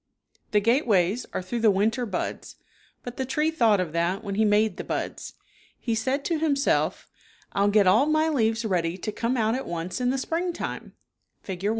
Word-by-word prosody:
^he 210 -1 +2
gateways 225 - +2
are - - -3
through 235 +6 -3
the 225 -1 +4
winter 220 +5 +1
buds, 190 -4 -4 0.5
but 245 0 -8
the 265 - -1
tree 300 +5 0
thought 230 -10 +3
of 175 -4 -2
that 175 +5 0
when 200 - -4
he 215 +3 +2
made 210 -1 +2
the - - -4
buds. - - -4 0.5
He 235 - -2
said 260 +6 -1
to 330 -3 0
himself, 290 -3 +1 0.2
" - - -30
I'll 200 0 +2
get 205 -1 +4
all 220 +10 +4
my 310 +1 +2
leaves 230 -6 +1
ready 175 -3 0
to 215 - -4
come 235 +4 -1
out 220 -1 +1
at 260 +2 -3
once 175 +6 -4
in 250 - +2
the 265 - 0
springtime 335 +6 -3 0.5
(Fig. 190 0 -6
225 Hz, 195 wpm, -25 LUFS, 195-260 Hz, 0.5 s, the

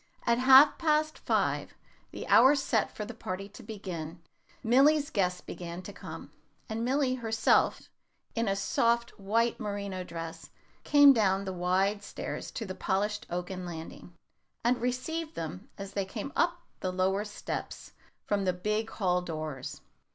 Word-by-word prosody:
At 235 0 +3
half 265 +3 +8
past 310 -1 +1
five, - - 0 0.3
the - - -7
hour 270 +3 +7
set 270 -5 +1
for 210 - -6
the 240 - -7
party 195 -3 -5
to 210 - -12
begin, 185 -7 -6 0.4
Milly's 285 +6 +4
guests 180 -3 0
began 175 +1 -7
to - - -8
come; - - -9 0.4
and 220 +1 -3
Milly 260 +1 +1
herself, 225 -3 +2 0.5
in 230 -1 0
a 195 - +1
soft 235 +4 +1
white 230 +4 +1
merino 200 -3 -4
dress, 165 -2 -7 0.3
came 285 -1 +8
down 200 -4 +2
the 190 - -3
wide 190 +3 +1
stairs - - -6
to 225 - -5
the 190 - -5
polished 210 +4 -1
oaken 180 +1 -4
landing, 170 0 -8 0.5
and 240 +1 +2
received 305 +7 -2
them 165 +5 -6
as 195 -1 -7
they 200 -1 -1
came 215 +7 -6
up 345 0 +1 0.2
the 185 - -2
lower 190 +2 +1
steps 210 -1 -6 0.3
from 200 -1 0
the 185 - +2
big 210 +5 -1
hall 180 -3 0
doors. 155 -6 -5
205 Hz, 150 wpm, -30 LUFS, 185-245 Hz, 0.5 s, half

